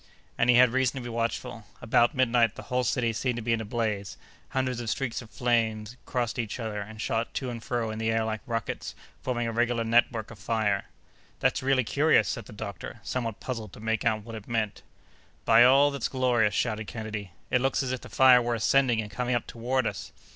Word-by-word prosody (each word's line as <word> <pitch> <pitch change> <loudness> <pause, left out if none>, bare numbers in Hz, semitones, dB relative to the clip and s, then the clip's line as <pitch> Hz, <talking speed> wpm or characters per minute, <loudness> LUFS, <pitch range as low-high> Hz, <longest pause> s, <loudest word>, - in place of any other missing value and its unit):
And 120 - +1
he 125 - +7
had 125 -1 +6
reason 130 +1 +1
to 130 - -5
be 120 - -6
watchful. 115 -1 -3
About 120 +4 +3
midnight, 120 -3 +3
the - - -8
whole 125 0 -1
city 115 0 0
seemed 125 +2 -1
to 120 - -4
be 115 +1 +1
in 115 - 0
a - - -5
blaze. 105 -3 -2 0.3
Hundreds 130 -2 -1
of 120 -2 -4
streaks 120 -1 -2
of 115 - -13
flame 115 -3 0 0.2
crossed 120 -1 -2
each 115 +1 -3
other, 110 -3 -3
and 110 +2 -9
shot 115 +1 -2
to 130 -2 -2
and 115 -1 -6
fro 115 -3 -2
in 110 - -5
the 110 0 0
air 115 0 +1
like 110 -1 -3
rockets, 115 -3 -3 0.3
forming 120 -2 -1
a 115 - -1
regular 120 0 +1
network 115 -1 +2
of 115 - -12
fire. 105 -1 0 0.5
"That's - - +1
really 130 -1 +2
curious!" 145 +7 +3
said - - -3
the - - -12
doctor, - - -7
somewhat 115 -4 -3
puzzled 115 -6 -5
to - - -11
make 110 0 -1
out 110 -2 +1
what 115 +1 -9
it 110 -2 -8
meant. 110 -3 -2 0.6
"By - - +7
all 135 +3 +6
that's 140 - -2
glorious!" 120 -6 +2
shouted 110 -3 -1
Kennedy, 110 -3 -5 0.2
"it 125 - +3
looks 135 +1 +1
as 130 - -2
if 130 - -3
the - - -11
fire 130 -2 +6
were 120 0 0
ascending 120 0 +3
and 105 -1 -8
coming 125 +2 -1
up 120 - -1
toward 125 +2 -1
us!" - - -4
115 Hz, 220 wpm, -27 LUFS, 110-125 Hz, 0.6 s, he